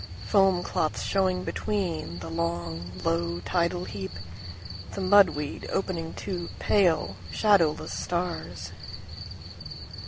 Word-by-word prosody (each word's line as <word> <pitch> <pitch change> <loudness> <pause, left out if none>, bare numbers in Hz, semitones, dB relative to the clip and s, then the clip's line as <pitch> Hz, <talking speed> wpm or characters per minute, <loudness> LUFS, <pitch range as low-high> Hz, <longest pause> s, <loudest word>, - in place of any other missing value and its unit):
Foam 190 - +4
clots 155 - -1
showing 185 -2 +1
betweenThe 165 - -2
long, 85 +1 -2
low 85 +1 0
tidal 175 - 0
heap, 95 -2 -5 0.9
The - - -3
mud 195 0 +7
weed 150 -1 -5
opening 170 -4 -2
two 175 -3 -4
pale, 185 -6 +3 0.2
shadowless 195 -8 +3
stars. 90 - -3
170 Hz, 95 wpm, -28 LUFS, -, 0.9 s, mud